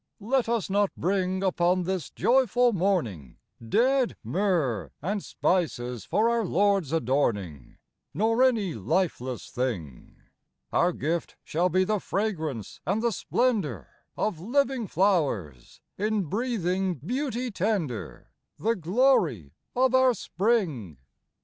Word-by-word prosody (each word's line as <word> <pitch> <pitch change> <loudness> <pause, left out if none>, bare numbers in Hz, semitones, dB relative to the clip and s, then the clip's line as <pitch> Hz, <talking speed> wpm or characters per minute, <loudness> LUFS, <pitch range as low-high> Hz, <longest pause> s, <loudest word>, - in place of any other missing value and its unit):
Let 235 +3 0
us 235 -3 0
not 200 0 +2
bring, 185 +1 0
upon 180 -1 +2
this 185 -3 -3
joyful 245 -1 +3
morning, 155 - -1 0.3
Dead 250 - +2
myrrh 170 - 0
and 200 +6 -2
spices 125 - -1
for 220 +2 +2
our 235 -1 +1
Lord's 195 -4 +1
adorning, 115 - -1 0.3
Nor 225 +3 +1
any 225 -9 +3
lifeless 150 -9 -2
thing: 105 - -4 0.6
Our 175 +1 +3
gift 165 +1 -3
shall 175 +4 0
be 185 +1 +3
the 210 +2 0
fragrance 160 - -3
and 210 +4 -1
the 235 - +2
splendor 190 - -1 0.3
Of 205 -7 -1
living 250 - 0
flowers, 145 - 0 0.2
in 210 0 +1
breathing 190 - -1
beauty 250 - -3
tender, 185 - -3 0.3
The 225 +2 +1
glory 175 - +2 0.2
of 255 0 +3
our 260 -1 +5
spring. 175 - -1
185 Hz, 115 wpm, -27 LUFS, 145-225 Hz, 0.6 s, our